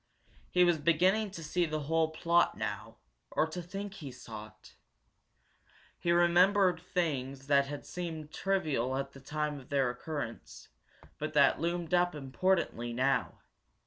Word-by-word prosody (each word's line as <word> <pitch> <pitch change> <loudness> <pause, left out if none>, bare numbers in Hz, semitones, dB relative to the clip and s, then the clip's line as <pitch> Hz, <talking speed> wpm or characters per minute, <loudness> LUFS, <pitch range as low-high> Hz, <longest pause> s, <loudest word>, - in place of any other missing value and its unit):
He 180 - +4
was 175 -3 +3
beginning 185 +8 +3
to 170 -4 -8
see 170 +3 0
the 155 0 -2
whole 160 +2 +1
plot 170 +2 +2
now, - - -4 0.3
or - - +2
to 160 +3 -5
think 195 +3 -6
he 150 -9 -8
saw 110 -3 -9
it. - - -19 1.3
He 170 - +1
remembered 175 +1 +4
things 140 -7 -2
that 140 -1 +3
had 145 0 -6
seemed 160 -4 -6
trivial 150 -10 0
at 135 0 -3
the 135 - -13
time 150 +1 -3
of 130 - -16
their 135 -3 +2
occurrence, 125 -2 -6 0.5
but 155 +1 -3
that 140 -2 +5
loomed 170 0 -2
up 175 -1 +3
importantly 135 -4 0
now. 135 +3 0
155 Hz, 145 wpm, -31 LUFS, 140-175 Hz, 1.3 s, that